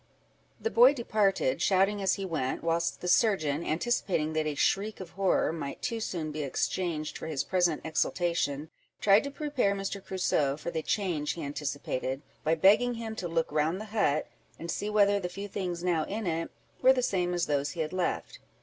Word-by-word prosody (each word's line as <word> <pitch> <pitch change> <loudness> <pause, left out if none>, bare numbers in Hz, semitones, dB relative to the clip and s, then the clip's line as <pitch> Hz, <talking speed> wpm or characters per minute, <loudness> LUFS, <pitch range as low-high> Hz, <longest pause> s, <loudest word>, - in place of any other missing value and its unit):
The 450 - -2
boy 255 +4 +7
departed, 205 - +1
shouting 195 +1 +3
as 190 -2 +2
he 195 - -4
went, 150 -8 -2
whilst 165 0 0
the 180 - -4
surgeon, 170 -7 +2
anticipating 170 -3 0
that 155 0 0
a 150 - -2
shriek 205 +8 +1
of 185 - -8
horror 190 -3 +1
might 145 -4 -6
too 235 -2 -1
soon 165 -7 -3
be 150 0 -4
exchanged 155 +2 -2
for - - -6
his 150 -4 -1
present 175 -4 +1
exultation, 160 -2 -1 0.3
tried 200 +1 +5
to - - -2
prepare 280 -8 0
Mr. 195 0 -4
Crusoe 150 -7 0
for 165 +3 -5
the 160 -1 -2
change 165 -5 -1
he 165 - -6
anticipated, 140 -2 -3 0.2
by 160 +2 +2
begging 210 +8 +4
him 225 -1 -5
to 180 - -3
look 165 -2 -1
round 155 +4 +1
the 215 - -6
hut, 155 -9 +2 0.3
and 170 - -5
see 205 - -2
whether 205 -1 +4
the 180 -2 -3
few 200 +3 -6
things 180 -3 -4
now 170 -3 +1
in 215 +2 -4
it 165 -1 -1 0.3
were 260 - +7
the 255 -1 0
same 180 -5 0
as 175 - +1
those 145 -1 -1
he 170 - -3
had 155 +2 -3
left. 185 - -2
175 Hz, 195 wpm, -29 LUFS, 155-200 Hz, 0.3 s, boy